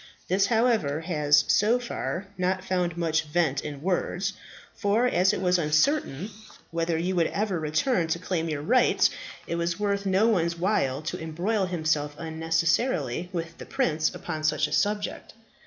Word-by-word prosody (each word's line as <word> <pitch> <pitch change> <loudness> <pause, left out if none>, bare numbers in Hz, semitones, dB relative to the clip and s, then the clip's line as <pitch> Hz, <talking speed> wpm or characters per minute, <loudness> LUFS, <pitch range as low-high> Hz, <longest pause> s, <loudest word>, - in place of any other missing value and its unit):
This, 195 +2 +2
however, 220 - +1
has, 150 -3 +3
so 220 +4 +4
far, 235 -5 -4
not 185 0 -1
found 180 -3 -1
much 165 -1 +1
vent 150 -3 0
in 145 -1 -7
words, 190 +1 -1 0.4
for 220 +3 +1
as 190 -6 +3
it - - -2
was 180 -1 +2
uncertain 170 - +1 0.4
whether 165 0 0
you 180 +3 -1
would 170 -2 +3
ever 200 -4 -1
return 160 - +1
to 160 +1 0
claim 170 -2 -2
your 150 -2 -3
rights, 250 +9 +3 0.3
it 170 - -3
was 170 +2 -1
worth 200 -1 -1
no 190 +3 +3
one's 170 -6 +1
while 155 -7 0
to 155 - -4
embroil 185 +6 -1
himself 155 -4 -1
unnecessarily 165 - 0
with 170 -2 -5
the - - -8
prince 155 0 +1
upon 155 -3 -5
such 155 0 +2
a - - -11
subject. 205 +7 -1
170 Hz, 160 wpm, -26 LUFS, 155-195 Hz, 0.4 s, so